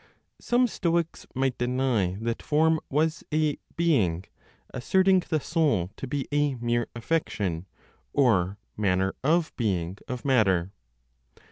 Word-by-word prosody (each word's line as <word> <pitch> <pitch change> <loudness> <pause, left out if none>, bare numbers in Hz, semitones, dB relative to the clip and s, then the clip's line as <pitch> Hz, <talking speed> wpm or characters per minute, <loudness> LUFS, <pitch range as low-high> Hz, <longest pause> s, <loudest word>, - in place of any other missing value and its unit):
Some 245 +1 +2
Stoics 170 -7 -1
might 130 -1 0
deny 120 -7 0
that 115 0 -2
form 160 +1 +2
was 155 +3 0
a 155 -1 +1 0.2
"being," 100 - +1 0.5
asserting 190 +9 +3
the 155 - +1
soul 140 - 0
to 135 - -6
be 135 +1 -3
a 145 -2 +1
mere 120 0 -1
affection 105 - -2 0.4
(or, 100 -8 +2 0.2
manner 95 -2 +1
of 160 +3 +1
being) 95 -5 -1
of 125 +1 -5
matter. 100 -9 +2
130 Hz, 120 wpm, -27 LUFS, 100-155 Hz, 0.5 s, asserting